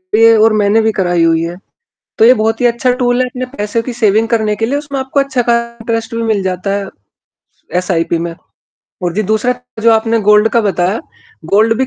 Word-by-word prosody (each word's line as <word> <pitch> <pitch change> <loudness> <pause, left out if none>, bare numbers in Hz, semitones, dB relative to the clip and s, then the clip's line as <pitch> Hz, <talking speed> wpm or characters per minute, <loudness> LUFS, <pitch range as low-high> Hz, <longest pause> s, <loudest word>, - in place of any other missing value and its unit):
भी 225 +1 +5
है, 225 -1 +6
और 220 0 +4
मैंने 210 +1 +2
भी 220 0 +1
कराई 175 -4 0
हुई 165 0 +2
है। 170 +1 -5 0.6
तो 220 - +5
ये 250 +2 +7
बहुत 225 +1 -1
ही 245 - +3
अच्छा 240 +2 +1
टूल 245 0 +1
है, 255 - +2
अपने 255 0 -5
पैसों 210 +2 -2
की 250 - -5
सेविंग 225 -1 +1
करने 215 -3 0
के 225 - -1
लिए, 280 +4 -1
उसमें 285 -2 -5
आपको 265 +2 -1
अच्छा 265 -3 -1
खासा 235 0 -1
इंटरेस्ट 225 0 -3
भी 230 - -2
मिल 215 -3 0
जाता 185 +1 -3
है 200 -1 -2 0.9
एसआईपी 170 -2 0
में। 170 0 -4 0.7
और 175 -1 -1
जी, 215 - 0
दूसरा 220 +5 0 0.3
जो 230 - +5
आपने 225 +1 +1
गोल्ड 210 +1 +4
का 235 - +2
बताया 190 0 0 0.5
गोल्ड 220 +5 +3
भी 265 - +1
225 Hz, 220 wpm, -14 LUFS, 200-235 Hz, 0.9 s, ये